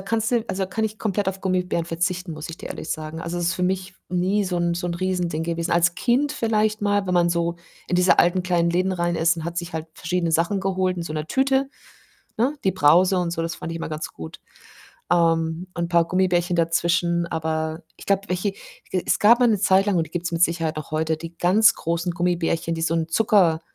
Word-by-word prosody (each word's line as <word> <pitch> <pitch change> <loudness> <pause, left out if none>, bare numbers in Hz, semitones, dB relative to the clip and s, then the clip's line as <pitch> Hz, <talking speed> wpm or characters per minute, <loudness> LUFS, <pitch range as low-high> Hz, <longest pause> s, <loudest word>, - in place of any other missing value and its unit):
kannst 220 +3 -1
du 235 -2 +1
also, 190 +1 -2
da - - -6
kann 220 +4 -2
ich 215 0 -4
komplett 205 -2 -1
auf 190 0 -4
Gummibären 180 -3 -1
verzichten, 175 +1 -2
muss 155 +1 -7
ich 165 - -7
dir - - -9
ehrlich - - -7
sagen. 155 +1 -4
Also, 170 +1 -4
es 175 - -2
ist 170 - 0
für 180 - -4
mich 185 0 -1
nie 185 +3 +1
so 180 -2 -2
'n 170 0 0
so 175 +1 -3
'n 170 - -2
Riesending 180 -4 -1
gewesen. 170 0 -2
Als 170 0 +3
Kind 255 +9 +1
vielleicht 215 -3 0
mal, 205 -1 +1
wenn 180 - 0
man 175 -1 +3
so 170 0 -1 0.3
in 180 - +1
diese 180 +1 +4
alten 175 +1 +3
kleinen 170 -2 +1
Läden 185 +2 +1
rein 175 -1 -1
ist 170 +1 +2
und 160 - -6
hat 170 0 -3
sich 175 -1 -6
halt 160 0 -4
verschiedene 170 0 -2
Sachen 170 +5 +1
geholt, 185 -1 0
in 175 - -3
so 165 - -6
'ner 155 0 -3
Tüte, 270 +3 +1 0.7
ne? 260 +7 +1
Die 190 - +2
Brause 180 +6 +4
und 175 -1 -1
so, 165 -1 -2
das 165 +1 -3
fand 165 - -6
ich - - -4
immer 165 - -5
ganz 155 0 -5
gut, 80 -1 -10 0.7
ähm, 165 0 +1
und 170 - -2
'n 170 - -4
paar 170 -1 +3
Gummibärchen 180 -1 +1
dazwischen, 170 +1 +1
aber 160 0 -2
ich - - -13
glaube, 200 -1 +2
welche 180 +3 -1 0.4
es 185 - 0
gab 235 +4 +6
mal 245 - +5
'ne 215 -3 +2
Zeit 190 0 +4
lang 205 -3 +1
und 165 -2 +1
die - - -19
gibt's 175 0 -3
mit 165 0 0
Sicherheit 165 -2 +1
noch 155 - -6
heute, 160 +1 0
die 165 +1 -9
ganz 200 +5 +5
großen 170 +1 -2
Gummibärchen, 170 -1 -1
die 165 - -4
so 165 0 +1
'n 165 -1 -1
Zucker, 175 -3 +3
175 Hz, 240 wpm, -23 LUFS, 165-190 Hz, 0.7 s, gab